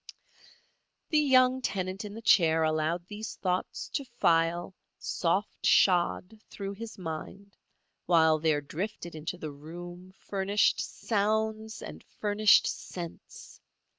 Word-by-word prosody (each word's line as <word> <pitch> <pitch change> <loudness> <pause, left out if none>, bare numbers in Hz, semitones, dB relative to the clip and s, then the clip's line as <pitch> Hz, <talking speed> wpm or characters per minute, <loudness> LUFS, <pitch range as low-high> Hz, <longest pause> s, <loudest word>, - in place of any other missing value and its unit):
The 305 - +3
young 260 -2 +4
tenant 190 -3 -3
in 210 0 -7
the 225 - -9
chair 160 -6 +4
allowed 155 +2 0
these 210 +3 -7
thoughts 185 -1 -2
to 280 - -2
file, 175 -7 +1 0.2
soft 190 +4 -1
shod, 185 +3 +3
through 200 -1 -5
his 225 +2 -8
mind, 190 +3 -7 0.5
while 160 -2 +5
there 155 -2 +1
drifted 175 +4 -5
into 160 +3 -5
the 155 -3 -6
room 175 +5 -10
furnished 200 +1 +1
sounds 220 0 -1
and - - -9 0.2
furnished 210 0 +5
scents. 170 -2 -7
185 Hz, 115 wpm, -29 LUFS, 165-215 Hz, 0.5 s, while